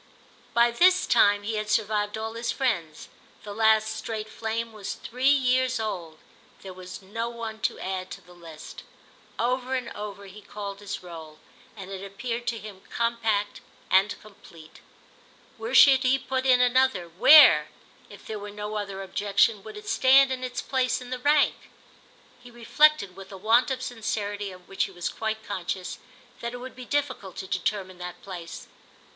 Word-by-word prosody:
By 235 Hz, 0 st, +5 dB
this 365 Hz, +9 st, +4 dB
time 205 Hz, -3 st, +4 dB
he 220 Hz, +1 st, -2 dB
had 215 Hz, 0 st, -3 dB
survived 210 Hz, -1 st, 0 dB
all 220 Hz, 0 st, -4 dB
his 230 Hz, +1 st, -2 dB
friends; 170 Hz, -, -2 dB, 0.4 s
the 205 Hz, -, -7 dB
last 220 Hz, 0 st, +3 dB
straight 220 Hz, -1 st, -5 dB
flame 225 Hz, +1 st, -4 dB
was 210 Hz, -2 st, -6 dB
three 255 Hz, +3 st, 0 dB
years 255 Hz, -2 st, +2 dB
old, 175 Hz, -8 st, -4 dB, 0.5 s
there 190 Hz, -1 st, -8 dB
was 185 Hz, +1 st, -10 dB
no 230 Hz, +5 st, -4 dB
one 230 Hz, -2 st, -7 dB
to -, -, -1 dB
add 185 Hz, -1 st, -4 dB
to -, -, -9 dB
the 180 Hz, -, -17 dB
list. 165 Hz, -3 st, -11 dB, 0.6 s
Over 255 Hz, +2 st, -1 dB
and 255 Hz, -2 st, -3 dB
over 205 Hz, -1 st, -7 dB
he 200 Hz, +2 st, -12 dB
called 200 Hz, -1 st, -7 dB
his 205 Hz, -2 st, -6 dB
roll, 160 Hz, -3 st, -10 dB, 0.4 s
and 195 Hz, -1 st, -9 dB
it 195 Hz, 0 st, -6 dB
appeared 235 Hz, +4 st, -5 dB
to 235 Hz, -1 st, -1 dB
him 205 Hz, -3 st, -10 dB
compact 230 Hz, -3 st, -1 dB, 0.3 s
and 195 Hz, +2 st, +3 dB
complete. 170 Hz, -6 st, -16 dB, 0.8 s
Where 230 Hz, +3 st, -4 dB
should 265 Hz, -1 st, +8 dB
he 260 Hz, 0 st, +3 dB
put 260 Hz, 0 st, -2 dB
in 250 Hz, -1 st, +5 dB
another, 250 Hz, -7 st, +2 dB
where, 215 Hz, -, +7 dB, 0.4 s
if -, -, -14 dB
there 215 Hz, -1 st, -5 dB
were 205 Hz, 0 st, -7 dB
no 210 Hz, +1 st, -5 dB
other 195 Hz, -2 st, -5 dB
objection, 205 Hz, +2 st, +1 dB
would 215 Hz, +1 st, -10 dB
it 210 Hz, -, -11 dB
stand 265 Hz, +1 st, +5 dB
in 255 Hz, -1 st, -3 dB
its 250 Hz, -1 st, -4 dB
place 260 Hz, -2 st, 0 dB
in 250 Hz, 0 st, -10 dB
the 255 Hz, -, -3 dB
rank? 290 Hz, +2 st, +2 dB, 0.7 s
He 245 Hz, -, -13 dB
reflected, 240 Hz, -3 st, +2 dB
with 195 Hz, 0 st, -11 dB
a 195 Hz, -, -8 dB
want 225 Hz, +7 st, +3 dB
of 260 Hz, -1 st, -3 dB
sincerity 205 Hz, -4 st, -3 dB
of 180 Hz, -1 st, -14 dB
which 195 Hz, -, -1 dB
he -, -, -9 dB
was 175 Hz, -, -4 dB
quite 220 Hz, 0 st, -4 dB
conscious, 185 Hz, -1 st, -4 dB, 0.4 s
that 235 Hz, 0 st, -5 dB
it -, -, -5 dB
would 255 Hz, +1 st, -9 dB
be 255 Hz, -1 st, -9 dB
difficult 260 Hz, -10 st, -2 dB
to 190 Hz, -, -6 dB
determine 185 Hz, 0 st, -3 dB
that 180 Hz, -1 st, -7 dB
place. 175 Hz, -4 st, -8 dB
215 Hz, 175 wpm, -26 LUFS, 195-245 Hz, 0.8 s, should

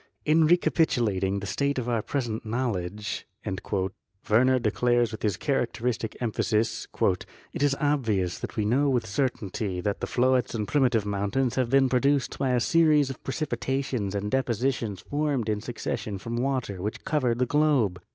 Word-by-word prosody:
"In 155 Hz, +1 st, +4 dB
recapitulating 110 Hz, -, +2 dB
the -, -, -5 dB
state 140 Hz, +9 st, -1 dB
of 125 Hz, -2 st, -2 dB
our 115 Hz, -2 st, +1 dB
pres 135 Hz, +2 st, -2 dB
ent 110 Hz, +1 st, -4 dB
knowledge," 105 Hz, -4 st, -3 dB, 1.0 s
Werner 130 Hz, +4 st, +4 dB
declares 120 Hz, 0 st, +1 dB
with 110 Hz, -, -7 dB
his 105 Hz, -5 st, 0 dB
characteristic 120 Hz, -4 st, -1 dB
emphasis, 110 Hz, -1 st, 0 dB, 0.7 s
"it -, -, -4 dB
is 145 Hz, -1 st, +3 dB
obvious 110 Hz, -12 st, 0 dB
that -, -, -6 dB
we 105 Hz, -, +1 dB
know 135 Hz, +7 st, +2 dB
with 125 Hz, -4 st, +1 dB
certainty 100 Hz, -4 st, -2 dB
that 100 Hz, +3 st, -2 dB
the -, -, -3 dB
floetz 130 Hz, 0 st, +2 dB
and 105 Hz, -2 st, -2 dB
primitive 125 Hz, -7 st, +2 dB
mountains 105 Hz, +6 st, 0 dB
have 130 Hz, -3 st, 0 dB
been 135 Hz, +1 st, +4 dB
produced 135 Hz, +2 st, +1 dB
by 135 Hz, -, +1 dB
a 125 Hz, -, +3 dB
series 150 Hz, 0 st, +3 dB
of 130 Hz, -, -11 dB
precipitations 130 Hz, -6 st, -2 dB
and 105 Hz, +1 st, -2 dB
depositions 120 Hz, -5 st, -1 dB
formed 145 Hz, -5 st, -1 dB
in 105 Hz, -1 st, -1 dB
suc 120 Hz, +1 st, -7 dB
cession 105 Hz, -2 st, -3 dB
from 115 Hz, +5 st, -5 dB
water 125 Hz, -7 st, -1 dB
which 105 Hz, +3 st, -4 dB
covered 130 Hz, -6 st, +1 dB
the 125 Hz, -, +2 dB
globe. 130 Hz, -11 st, +2 dB
120 Hz, 160 wpm, -27 LUFS, 105-135 Hz, 1.0 s, In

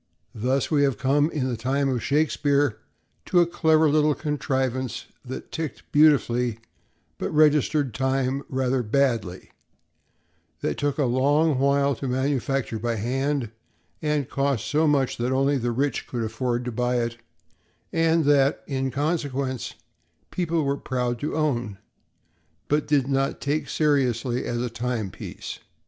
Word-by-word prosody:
Thus 130 Hz, +7 st, 0 dB
we 145 Hz, -2 st, +3 dB
have 135 Hz, -5 st, +2 dB
come, 145 Hz, +5 st, +2 dB
in 140 Hz, -6 st, -2 dB
the 125 Hz, -, -1 dB
time 135 Hz, +5 st, 0 dB
of 125 Hz, -3 st, -1 dB
Shakespeare, 145 Hz, -4 st, +1 dB, 0.5 s
to 180 Hz, -, +4 dB
a 175 Hz, -, +6 dB
clever 160 Hz, -2 st, +3 dB
little 150 Hz, 0 st, +3 dB
contrivance 130 Hz, -5 st, -2 dB, 0.2 s
that 130 Hz, 0 st, -8 dB
ticked 160 Hz, -4 st, -5 dB
beautifully 125 Hz, -6 st, +3 dB, 0.6 s
but -, -, -2 dB
registered 150 Hz, -3 st, +3 dB
time 130 Hz, 0 st, 0 dB
rather 130 Hz, -1 st, 0 dB
badly; 115 Hz, -6 st, 0 dB, 1.1 s
that -, -, -2 dB
took 145 Hz, -1 st, 0 dB
a 145 Hz, -, +2 dB
long 140 Hz, +4 st, +2 dB
while 140 Hz, +1 st, +3 dB
to 135 Hz, -, -4 dB
manufacture 130 Hz, -2 st, -1 dB
by 120 Hz, +1 st, -1 dB
hand, 130 Hz, +2 st, -1 dB, 0.5 s
and 150 Hz, -4 st, 0 dB
cost 135 Hz, -5 st, -1 dB
so 150 Hz, +8 st, +2 dB
much 140 Hz, -3 st, +1 dB
that 120 Hz, +2 st, -1 dB
only 135 Hz, +1 st, +2 dB
the 120 Hz, 0 st, -1 dB
rich 135 Hz, +2 st, -1 dB
could 120 Hz, -2 st, -3 dB
afford 120 Hz, +2 st, -2 dB
to 125 Hz, -, -3 dB
buy 125 Hz, +2 st, 0 dB
it, 120 Hz, 0 st, -2 dB, 0.8 s
and 165 Hz, -1 st, +3 dB
that, 140 Hz, -1 st, +3 dB
in 135 Hz, -1 st, -2 dB
consequence, 140 Hz, -3 st, -2 dB, 0.6 s
people 170 Hz, -3 st, 0 dB
were 140 Hz, 0 st, 0 dB
proud 125 Hz, -3 st, -2 dB
to 150 Hz, -, -3 dB
own, 120 Hz, -10 st, -1 dB, 0.9 s
but 150 Hz, +1 st, +1 dB
did 140 Hz, -3 st, +2 dB
not 135 Hz, 0 st, 0 dB
take 145 Hz, +2 st, -1 dB
seriously 130 Hz, -5 st, +1 dB
as 120 Hz, 0 st, -2 dB
a -, -, -1 dB
timepiece. 115 Hz, -5 st, -5 dB
135 Hz, 140 wpm, -25 LUFS, 125-145 Hz, 1.1 s, a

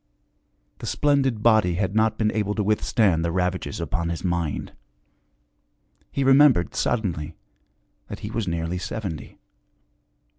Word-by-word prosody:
The -, -, -7 dB
splendid 135 Hz, -6 st, +1 dB
body 110 Hz, -7 st, +4 dB
had 95 Hz, +1 st, -1 dB
not 110 Hz, 0 st, +2 dB
been 110 Hz, -1 st, +1 dB
able 105 Hz, -1 st, -1 dB
to 105 Hz, -, 0 dB
with 105 Hz, +1 st, +1 dB
stand 95 Hz, -8 st, +2 dB
the 85 Hz, -, 0 dB
ravages 90 Hz, +1 st, -2 dB
upon 85 Hz, +1 st, -2 dB
his 85 Hz, -, -4 dB
mind; 85 Hz, -4 st, -2 dB, 1.4 s
he 140 Hz, -, -1 dB
remembered 135 Hz, -, +5 dB
suddenly 85 Hz, -10 st, -2 dB, 0.7 s
that -, -, -8 dB
he 105 Hz, -, -5 dB
was 115 Hz, -3 st, -2 dB
nearly 85 Hz, +1 st, -2 dB
seventy. 95 Hz, -5 st, -6 dB
100 Hz, 135 wpm, -24 LUFS, 85-110 Hz, 1.4 s, remembered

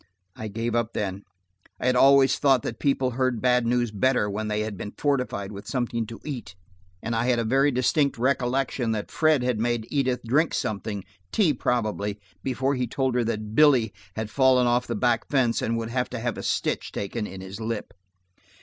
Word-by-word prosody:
I 110 Hz, -, -6 dB
gave 115 Hz, +3 st, -3 dB
up 115 Hz, -1 st, 0 dB
then. 100 Hz, -2 st, -3 dB, 0.6 s
I -, -, -4 dB
had 125 Hz, 0 st, +3 dB
always 135 Hz, +1 st, +5 dB
thought 135 Hz, -4 st, +4 dB
that 115 Hz, -, -5 dB
people 135 Hz, -2 st, +1 dB
heard 130 Hz, -1 st, 0 dB
bad 125 Hz, 0 st, +2 dB
news 120 Hz, -1 st, +1 dB
better 115 Hz, +1 st, +2 dB
when 105 Hz, +2 st, -3 dB
they 105 Hz, 0 st, -1 dB
had 110 Hz, -1 st, -3 dB
been 105 Hz, +2 st, -7 dB
fortified 125 Hz, -9 st, -1 dB
with 100 Hz, 0 st, -9 dB
something 120 Hz, -3 st, -2 dB
to 115 Hz, -, -9 dB
eat, 120 Hz, -11 st, -6 dB, 0.5 s
and 115 Hz, +1 st, -2 dB
I 115 Hz, +1 st, +1 dB
had 125 Hz, -1 st, +3 dB
a 115 Hz, -, +1 dB
very 135 Hz, +5 st, +3 dB
distinct 140 Hz, +2 st, +1 dB
recollection 125 Hz, -1 st, 0 dB
that 105 Hz, -1 st, -4 dB
Fred 155 Hz, -5 st, +3 dB
had 125 Hz, -3 st, 0 dB
made 120 Hz, -1 st, 0 dB
Edith 130 Hz, -3 st, 0 dB
drink 145 Hz, +8 st, +2 dB
something–tea 100 Hz, -, -2 dB
probably–before 110 Hz, +1 st, -2 dB
he 125 Hz, -2 st, -1 dB
told 130 Hz, +2 st, -1 dB
her 125 Hz, 0 st, +2 dB
that 110 Hz, -2 st, -3 dB
Billy 130 Hz, -6 st, +5 dB, 0.2 s
had 110 Hz, 0 st, -4 dB
fallen 130 Hz, -2 st, +4 dB
off 120 Hz, 0 st, +1 dB
the 120 Hz, -, -2 dB
back 115 Hz, 0 st, +1 dB
fence 130 Hz, -5 st, +2 dB
and 115 Hz, 0 st, 0 dB
would 115 Hz, 0 st, -4 dB
have 125 Hz, 0 st, -1 dB
to 125 Hz, -, -5 dB
have 120 Hz, -1 st, -2 dB
a -, -, -6 dB
stitch -, -, -1 dB
taken 105 Hz, +2 st, -3 dB
in 95 Hz, -, -9 dB
his 95 Hz, +3 st, -8 dB
lip. 110 Hz, -2 st, -4 dB
120 Hz, 195 wpm, -25 LUFS, 110-130 Hz, 0.6 s, always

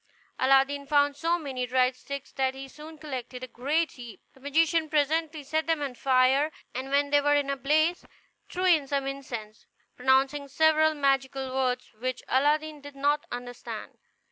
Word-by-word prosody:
Aladdin 270 Hz, +2 st, +3 dB
found 285 Hz, 0 st, +3 dB
so 335 Hz, +4 st, 0 dB
many 265 Hz, -6 st, -4 dB
dried 255 Hz, +1 st, +2 dB
sticks 280 Hz, +1 st, -7 dB
that 265 Hz, -1 st, -1 dB
he 270 Hz, 0 st, -8 dB
soon 305 Hz, +3 st, -12 dB
collected 255 Hz, -4 st, -7 dB
a -, -, -5 dB
great 295 Hz, +7 st, -1 dB
heap. 240 Hz, -4 st, -11 dB
The -, -, -21 dB
magician 315 Hz, +3 st, +1 dB
presently 310 Hz, +1 st, 0 dB
set 315 Hz, +3 st, -1 dB
them 325 Hz, -2 st, +1 dB
on 275 Hz, -3 st, -3 dB
fire; 265 Hz, +4 st, +3 dB, 0.2 s
and 260 Hz, +2 st, -5 dB
when 285 Hz, +1 st, +1 dB
they 290 Hz, 0 st, +5 dB
were 290 Hz, 0 st, +3 dB
in 285 Hz, -1 st, +1 dB
a -, -, -1 dB
blaze, 310 Hz, +6 st, +1 dB, 0.5 s
threw 365 Hz, +1 st, -2 dB
in 320 Hz, -6 st, +4 dB
some 275 Hz, -1 st, -1 dB
incense, 240 Hz, -6 st, -7 dB, 0.3 s
pronouncing 270 Hz, +2 st, +2 dB
several 315 Hz, +2 st, +3 dB
magical 270 Hz, -2 st, 0 dB
words 255 Hz, -1 st, -1 dB
which 255 Hz, +1 st, -3 dB
Aladdin 300 Hz, +2 st, +1 dB
did 285 Hz, 0 st, -11 dB
not 290 Hz, +2 st, 0 dB
understand. 245 Hz, 0 st, -7 dB
280 Hz, 170 wpm, -27 LUFS, 260-300 Hz, 0.5 s, they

